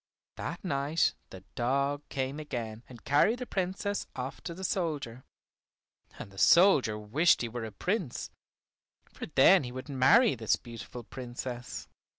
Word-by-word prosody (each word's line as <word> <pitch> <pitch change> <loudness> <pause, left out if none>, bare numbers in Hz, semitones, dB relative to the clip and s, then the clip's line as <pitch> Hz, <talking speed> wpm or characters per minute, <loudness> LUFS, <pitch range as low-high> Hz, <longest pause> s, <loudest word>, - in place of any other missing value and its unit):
That - - -5
night 145 -1 +1 0.2
the 95 - -10
dog 140 +4 0
came 135 +2 -3
again 115 -7 -5
and 120 -3 -13
carried 150 - +3
the 250 - -5
Princess 195 0 -2
off 130 +1 -5
to 170 - -5
the 190 - -8
soldier, 150 -10 -2 0.9
and 100 - -9
the 95 - -10
soldier 160 - +5
wished 130 +12 +3
he - - -1
were 120 0 -5
a 110 - -7
Prince, 180 - -3 0.8
for - - -7
then - - +6
he 125 - -6
would 130 +3 -8
marry 140 - +5
this 110 -3 +1
beautiful 120 0 -9
Princess. 125 0 -7
135 Hz, 150 wpm, -30 LUFS, 120-170 Hz, 0.9 s, then